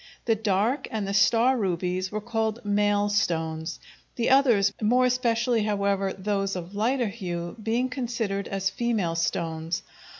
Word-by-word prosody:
The 230 - +3
dark 220 +4 0
and 215 -3 -3
the 195 - -2
star 230 +6 +4
rubies 185 -3 -1
were 215 0 -3
called 225 0 -2
"male" 205 0 +2
stones, 165 -5 -1 0.4
the 240 +1 +1
others, 235 -8 +4
more 245 +4 +3
especially, 240 -2 +1
however, 200 -2 0
those 195 0 -2
of 180 +1 -6
lighter 235 +3 +1
hue, 175 -5 -5
being 230 +4 0
considered 235 -6 -3
as 195 0 -1
"female" 215 -6 0
stones. 165 0 -2
205 Hz, 140 wpm, -26 LUFS, 190-230 Hz, 0.4 s, star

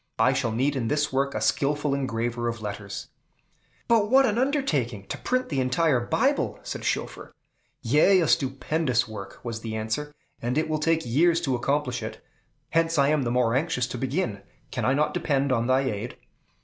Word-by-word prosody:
I 125 +4 +4
shall 125 -4 0
need 135 +6 0
in 120 -4 -1
this 150 +2 0
work 140 +1 0
a - - 0
skillful 145 0 +1
engraver 120 -3 -2
of 115 -1 -3
letters." 105 -1 -6 0.8
"But 220 -3 +3
what 270 +2 +6
an 225 -1 +1
undertaking, 150 - 0
to - - -3
print 255 0 -1
the 140 - -1
entire 130 +2 +2
Bible!" 120 - 0
said - - -5
Schoeffer. - - -3 0.5
"Yea, 155 - +5
a 165 - +1
stupendous 135 0 +1
work!" 100 -3 -8
was 115 -2 -4
the 110 -1 -5
answer, 110 +7 -3 0.3
"and 120 +4 -1
it 155 - +1
will 155 -1 -1
take 165 0 +1
years 165 +8 +3
to 140 -6 0
accomplish 125 0 -1
it; - - -6 0.5
hence 165 0 +2
I 140 0 +4
am 150 -1 +2
the 120 - -1
more 120 -2 +2
anxious 135 -2 0
to 125 - -5
begin. 130 - -2 0.3
Can - - -2
I 130 - +3
not 150 +1 +1
depend 140 -5 0
on 120 -2 +1
thy 130 +1 +3
aid?" 120 -3 -4
135 Hz, 190 wpm, -26 LUFS, 120-155 Hz, 0.8 s, what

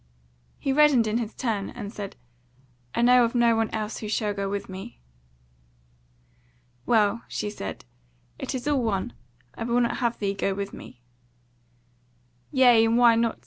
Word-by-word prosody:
He 270 - -1
reddened 285 -5 +5
in 220 +2 0
his 225 -2 -5
turn, 215 -6 -2
and 210 -3 -8
said: 200 -2 -7 0.8
"I 235 - +1
know 250 0 +6
of 235 +1 -1
no 235 -1 +4
one 225 0 0
else 215 0 -4
who 215 - -6
shall 210 -1 0
go 200 -1 -3
with 200 0 -4
me." 190 - -9 1.9
"Well," 220 0 +3
she 210 - -4
said, 95 - -7 0.5
"it - - -4
is 255 +2 -5
all 290 -3 +2
one, 220 0 -2 0.4
I - - -6
will 240 +1 +1
not 235 -1 0
have 235 -2 -1
thee 200 -1 -1
go 195 0 -1
with 200 0 -5
me." 120 -1 -12 1.5
"Yea, 245 -4 +6
and 225 +1 +2
why 240 -1 +6
not?" 230 0 0
225 Hz, 165 wpm, -25 LUFS, 205-240 Hz, 1.9 s, know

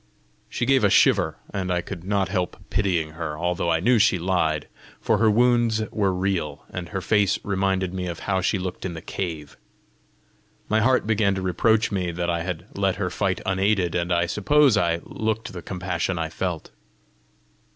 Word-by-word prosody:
She 120 - -2
gave 135 -1 +3
a 100 - +5
shiver, 95 - +3 0.2
and 95 -2 -2
I 90 -1 +1
could 85 -1 -8
not 100 0 0
help 90 -1 -2
pitying 90 -6 0
her, 80 -1 -5
although 85 +1 -1
I 80 -1 +2
knew 115 +6 +3
she 105 -3 +4
lied, 85 -4 0 0.3
for - - +1
her 110 0 +4
wounds 120 -1 +3
were 100 -3 +1
real, 90 -6 -2
and 90 -1 -6
her 95 -2 -3
face 105 0 +2
reminded 95 -2 0
me 90 -1 -3
of 85 -2 -6
how 95 -2 0
she 95 - +1
looked 90 -1 -5
in 85 -3 -4
the 80 - -7
cave. 80 -6 -5 1.1
My 110 - +2
heart 130 +2 +3
began 105 -2 +2
to 95 - -3
reproach 110 +5 +2
me 90 -3 -1
that 85 0 -1
I 85 -1 -1
had 85 -1 -4
let 95 -2 +1
her 95 -2 -2
fight 95 0 -1
unaided, 95 -2 +1
and 85 0 -1
I 85 0 +2
suppose 135 - +3
I 85 -4 +1
looked 110 -1 -3
the 90 - -6
compassion 90 -1 -3
I 80 -1 -2
felt. 85 0 -4
95 Hz, 185 wpm, -24 LUFS, 85-105 Hz, 1.1 s, a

